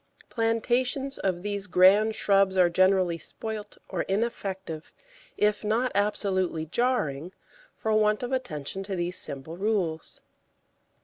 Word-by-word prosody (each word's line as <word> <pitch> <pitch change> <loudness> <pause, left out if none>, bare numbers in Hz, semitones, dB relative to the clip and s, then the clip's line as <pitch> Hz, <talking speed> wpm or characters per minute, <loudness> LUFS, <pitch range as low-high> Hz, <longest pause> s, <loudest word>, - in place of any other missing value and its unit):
Plantations 245 +4 0
of 185 -2 -1
these 205 -1 -2
grand 200 +5 +5
shrubs 195 -1 +3
are 180 -2 +5
generally 185 -1 +3
spoilt 215 +2 -6
or 180 -3 -2
ineffective, 190 -6 -3 0.5
if 210 0 +1
not 230 +4 +1
absolutely 190 -5 +1
jarring, 175 - -1 0.4
for 220 - -1
want 215 +1 +2
of 245 - -3
attention 190 - -3
to 195 0 -4
these 175 +1 -2
simple 140 +5 -4
rules. 190 -6 -1
195 Hz, 120 wpm, -27 LUFS, 180-220 Hz, 0.5 s, grand